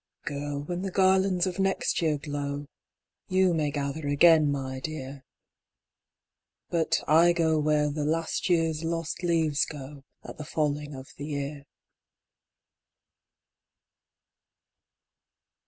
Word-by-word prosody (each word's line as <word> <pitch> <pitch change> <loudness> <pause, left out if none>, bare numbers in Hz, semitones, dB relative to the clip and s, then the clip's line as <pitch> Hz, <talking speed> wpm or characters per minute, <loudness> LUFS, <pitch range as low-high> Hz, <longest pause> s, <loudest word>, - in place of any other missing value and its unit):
Girl! 145 0 -4
when 175 +4 -4
the 195 - -2
garlands 190 -1 +3
of 185 +1 -4
next 195 -2 0
year 155 -3 +1
glow, 145 0 -4 0.6
YOU 185 -2 +3
may 155 -3 0
gather 145 +1 -3
again, 150 +1 +5
my 130 -2 -3
dear 135 -2 -6 1.5
But 160 -1 +1
I 170 +3 +6
go 160 -2 +2
where 150 0 +2
the 150 0 -3
last 165 +4 -1
year's 165 -2 +1
lost 165 0 -3
leaves 160 -4 +2
go 140 -1 -8 0.2
At - - -10
the - - -4
falling 150 -1 -2
of 130 0 -10
the 145 - -6
year." 140 -1 -4
155 Hz, 115 wpm, -27 LUFS, 145-170 Hz, 1.5 s, I